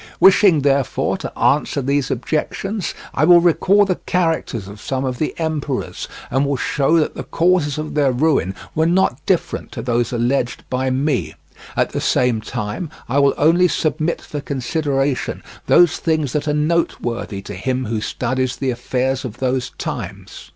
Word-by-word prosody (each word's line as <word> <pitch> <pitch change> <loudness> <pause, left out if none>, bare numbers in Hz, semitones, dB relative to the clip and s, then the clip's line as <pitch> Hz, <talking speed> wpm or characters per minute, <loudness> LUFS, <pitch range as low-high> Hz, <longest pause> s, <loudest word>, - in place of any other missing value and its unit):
Wishing, 190 -5 +6
therefore, 140 -1 +1
to - - -7
answer 145 0 +2
these 140 0 0
objections, 180 - -2 0.2
I - - +1
will 175 -1 +8
recall 185 +4 +4
the 185 -2 -1
characters 160 - 0
of 100 +1 -11
some 135 0 -2
of 125 -2 -3
the 155 - -1
emperors, 155 -4 -3 0.2
and 130 +2 +2
will 140 -1 0
show 150 +5 +2
that 155 - +1
the - - -6
causes 170 -4 +1
of 155 0 -4
their 145 -3 +3
ruin 125 - +1 0.2
were 160 +1 +2
not 170 -6 +1
different 185 -3 -1
to - - -5
those 120 -1 0
alleged 120 +1 0
by 130 +1 0
me; 135 +1 -1 0.4
at - - +1
the - - -3
same 125 -3 +2
time 110 - -4 0.2
I 135 +4 +1
will 140 -1 +3
only 170 +4 +4
submit 155 0 -1
for 145 - -5
consideration 140 0 -1 0.2
those 175 -3 +5
things 155 -5 0
that 150 0 -1
are - - +2
noteworthy 150 -9 -1
to 105 - -7
him 130 +7 -2
who 110 -1 -2
studies 130 +3 -1
the 135 -2 -1
affairs 130 +2 -1
of 120 -3 -6
those 130 -1 -1
times. - - -6
140 Hz, 165 wpm, -19 LUFS, 125-160 Hz, 0.4 s, will